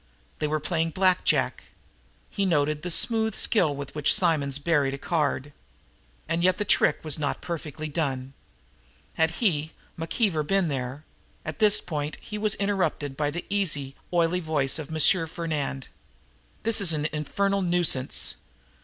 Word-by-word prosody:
They 150 - 0
were 155 +1 -1
playing 165 +1 -1
Black 185 -1 +3
Jack. - - +1 0.7
He 200 - -1
noted 150 -4 +1
the 180 - -4
smooth 220 +5 +3
skill 165 -10 +2
with 140 -1 -7
which 150 -1 +4
Simonds 155 -8 +2
buried 145 -3 +1
a - - -8
card. 145 -3 -1 0.7
And 170 +1 -1
yet 185 0 +3
the 210 - -2
trick - - +3
was 155 -1 +1
not 145 - -2
perfectly 155 -3 -5
done. 135 -4 -2 0.8
Had 160 0 +2 0.2
he, 155 -4 +1 0.3
McKeever, 165 0 0
been 195 -2 +2
there 135 +2 -4 0.4
At 155 - -6
this 210 -1 +5
point 150 -3 -4
he 210 - -7
was 210 -1 +1
interrupted 195 -8 -1
by 145 +1 0
the 170 +4 -5
easy, 155 -9 -1 0.2
oily 175 0 +2
voice 155 -4 0
of 150 - -7
M. 165 +2 +4
Fernand. 150 -5 -4 0.8
"This 225 -1 +2
is 175 -5 +3
an 150 -1 -2
infernal 195 +7 0
nuisance!" 175 -7 +1
160 Hz, 155 wpm, -26 LUFS, 145-185 Hz, 0.8 s, this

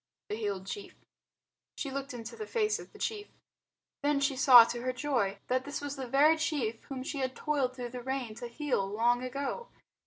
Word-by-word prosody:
The 210 - -1
Healed 200 -4 -3
Chief 405 - -7 0.8
She 275 - -4
looked 275 +1 -4
into 235 -2 -7
the 435 - -6
face 430 -2 +1
of - - -11
the - - -14
chief. 420 -2 -3 0.7
Then 290 -1 +2
she 280 -1 +1
saw 255 -2 +10
to 240 +1 -4
her 255 +1 0
joy 250 -7 0
that 255 +1 +1
this 285 +2 -4
was 285 -1 -4
the 265 -2 -5
very 290 +6 +5
chief 270 -9 -1
whom 260 -2 -5
she 280 +1 -4
had 260 -1 -1
toiled 275 -4 0
through 245 -2 -5
the 250 0 -6
rain 260 -3 -3
to 240 - -5
heal 260 -2 -1
long 230 +5 +2
ago. 275 - -3
260 Hz, 205 wpm, -31 LUFS, 240-290 Hz, 0.8 s, saw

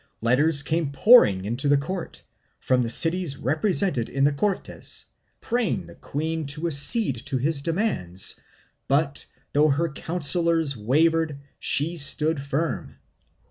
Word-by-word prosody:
Letters 140 +6 +2
came 155 0 -3
pouring 135 - +3
into 120 +7 -3
the 145 0 +2
court, 170 +5 -7 0.4
from 130 -1 -1
the 115 - -3
cities 165 +2 +2
represented 155 - 0
in 135 - -3
the 145 +1 +1
Cortes, 195 +7 -2 0.4
praying 235 - -3
the 85 - -15
queen 160 - -6
to 150 +4 -3
accede 145 - +4
to 140 -2 -2
his 140 +3 -1
demands 160 - -1 0.5
but, 140 0 -2 0.3
though 150 +2 +2
her 160 +4 -1
councillors 165 0 +2
wavered, 155 +7 -1 0.2
she 160 +4 +1
stood 150 0 +2
firm. 140 +4 -5
150 Hz, 130 wpm, -22 LUFS, 135-165 Hz, 0.5 s, accede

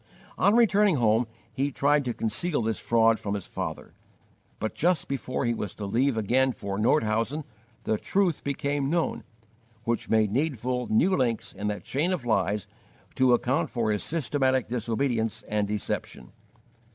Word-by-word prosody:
On 205 - +3
returning 210 -5 +4
home 115 -2 +2 0.3
he 140 +2 -1
tried 145 +1 +2
to 120 - -1
conceal 145 +5 -1
this 110 0 -1
fraud 115 -1 +3
from 100 -1 -3
his 100 - -5
father; - - -6 0.6
but 110 - -3
just 170 -2 +1
before 130 -1 -2
he 120 - +2
was 105 -4 -5
to 105 - -5
leave 120 +5 +1
again 125 +5 +2
for 100 -2 -4
Nordhausen 115 +4 +1 0.4
the 110 - 0
truth 190 -5 0
became 140 0 -1
known, 170 +1 0 0.6
which 115 0 -2
made 110 -2 +3
needful 125 -2 -1
new 180 - +3
links 120 -4 -1
in 105 - -4
that 105 -1 -3
chain 155 +7 0
of 175 -10 -2
lies 105 -2 +1 0.5
to 130 -1 +4
account 125 +3 0
for 115 -3 0
his 105 - -1
systematic 135 -4 0
disobedience 115 0 -1
and 105 -1 0
deception. 100 -10 -4
120 Hz, 155 wpm, -27 LUFS, 110-140 Hz, 0.6 s, returning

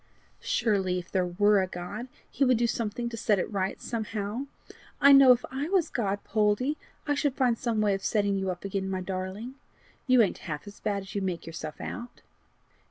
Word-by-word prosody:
"Surely 190 -5 +1
if 180 0 -7
there 185 -2 +1
were 205 +3 +3
a 185 - -1
God, 185 +7 -6 0.2
he 280 - -1
would 255 -3 +4
do 235 - +2
something 230 +1 -2
to 235 - -5
set 215 -2 +2
it 190 - -2
right 195 -2 -2
somehow! 225 +2 -3 0.5
I 280 -1 +7
know 275 -2 +9
if 245 -1 +3
I 275 +4 -3
was 375 -4 +2
God, 205 -5 -1
Poldie, 215 +7 +1 0.3
I 290 - +1
should 285 -2 0
find 250 -3 +2
some 230 -2 -1
way 205 -1 +3
of 195 - -3
setting 205 -2 +1
you 190 -1 -1
up 180 +1 -5
again, 195 -1 -2
my 190 -1 -2
darling. 190 +6 -5 0.5
You 255 -2 +6
ain't 195 - -1
half 150 -1 -4
as 205 0 -11
bad 200 -2 -2
as 195 - -11
you 200 - -1
make 185 -3 -3
yourself 160 -2 -7
out." 240 0 -7
210 Hz, 205 wpm, -28 LUFS, 190-240 Hz, 0.5 s, know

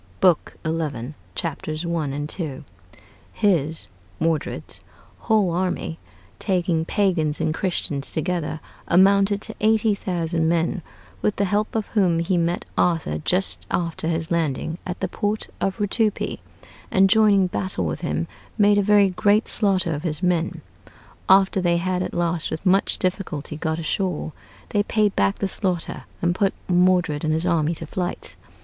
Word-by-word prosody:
[Book 180 -4 +2
xi., 150 -5 -2 0.2
Chapters 155 0 -3
i. 170 -2 -1
and 145 +2 -3
ii.] 145 -6 -4 0.7
His 165 -7 +1 0.3
[Modred's] 160 -2 -2 0.4
whole 215 -5 +2
army, 175 -2 -2 0.4
taking 175 -3 0
Pagans 170 -7 +1
and 155 - 0
Christians 155 -6 -1
together, 160 -1 -2 0.3
amounted 200 +3 +4
to - - -4
eighty 220 0 +3
thousand 170 -4 -1
men, 170 +2 0 0.4
with 210 - +1
the 200 - +1
help 210 +3 0
of 220 -2 0
whom 185 -6 +2
he 170 +3 0
met 170 0 0
Arthur 165 - +1
just 180 - 0
after 165 -2 -2
his 165 0 -2
landing 165 0 -1
at 180 - -4
the 190 - 0
port 205 +3 -2
of 195 -1 0
Rutupi, 210 +1 0 0.5
and 195 0 +5
joining 205 -2 +5
battle 185 +1 -2
with - - -3
him, 165 -1 -1 0.3
made 205 -1 +5
a - - +4
very 200 -1 +4
great 205 +3 +2
slaughter 190 -5 +2
of 145 - -3
his 165 +1 -3
men.... 175 -2 0 0.7
After 190 0 +5
they 175 -1 +2
had 180 +1 -1
at - - -4
last, 170 -1 0
with 160 - -5
much 190 +2 +3
difficulty, 175 -6 -2
got 160 0 -2
ashore, 165 0 -2 0.4
they 205 - +2
paid 210 -1 +1
back 100 0 +2
the 195 - -1
slaughter, 185 -4 -2 0.2
and 175 0 +3
put 195 +1 +1
Modred 180 -4 +3
and 155 - +1
his 160 +2 0
army 165 -2 +1
to 165 - -5
flight. 175 +3 -4
175 Hz, 155 wpm, -23 LUFS, 160-195 Hz, 0.7 s, and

